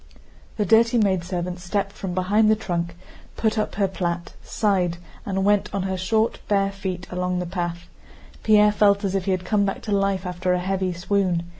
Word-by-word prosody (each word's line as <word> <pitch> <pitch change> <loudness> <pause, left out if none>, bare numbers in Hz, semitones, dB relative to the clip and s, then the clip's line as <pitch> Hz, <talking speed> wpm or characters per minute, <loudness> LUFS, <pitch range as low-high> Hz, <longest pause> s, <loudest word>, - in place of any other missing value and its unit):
The 210 - +1
dirty 230 +3 +4
maidservant 180 -3 0
stepped 195 +2 -2
from 190 -3 -5
behind 205 +4 +3
the 215 - +5
trunk, 170 -5 -3 0.4
put 220 -1 +1
up 215 - -2
her 200 -1 +2
plait, 175 -2 -3
sighed, 185 -6 0 0.3
and 190 -1 0
went 205 0 +2
on 195 - -1
her 190 0 -2
short, 220 +5 0
bare 195 -1 +2
feet 190 -2 -5
along 180 0 -1
the 180 - -2
path. 175 -1 -4 0.5
Pierre 210 -1 +5
felt 205 0 +3
as 195 -1 -1
if 195 -2 -1
he 195 - +1
had 185 -1 -1
come 205 +1 +2
back 195 -1 -2
to 215 - -5
life 195 -1 +1
after 180 0 -1
a 180 - +1
heavy 190 0 -1
swoon. 180 0 0
190 Hz, 190 wpm, -23 LUFS, 180-205 Hz, 0.5 s, the